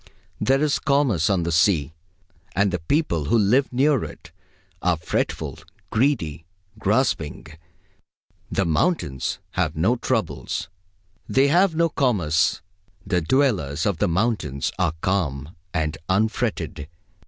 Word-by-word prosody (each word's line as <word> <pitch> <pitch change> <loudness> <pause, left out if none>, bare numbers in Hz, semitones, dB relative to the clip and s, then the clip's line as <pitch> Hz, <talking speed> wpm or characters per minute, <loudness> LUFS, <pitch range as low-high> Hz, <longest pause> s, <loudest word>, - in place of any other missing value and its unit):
There 135 +6 +2
is 150 -1 +1
commerce 135 - +2
on 95 -4 +2
the 85 - -1
sea, 80 -4 +2 0.6
and 100 0 +2
the 90 - -1
people 85 - 0
who 115 - +3
live 115 +6 +3
near 135 0 +2
it - - -10 0.5
are 90 -2 +2
fretful, 80 - -2 0.3
greedy, 110 - 0 0.4
grasping. 105 - 0 1.1
The 95 - +1
mountains 80 - 0
have - - -1
no - - +2
troubles; - - -2 0.6
they 135 +1 +4
have 175 +2 +3
no 170 +1 +3
commerce. 90 - +1 0.4
The 90 -3 +1
dwellers 85 - +1
of 100 -6 0
the - - +2
mountains 85 - 0
are 90 -4 +2
calm 80 -6 -1 0.2
and 80 -2 -2
unfretted. 100 - -1
95 Hz, 120 wpm, -23 LUFS, 80-130 Hz, 1.1 s, they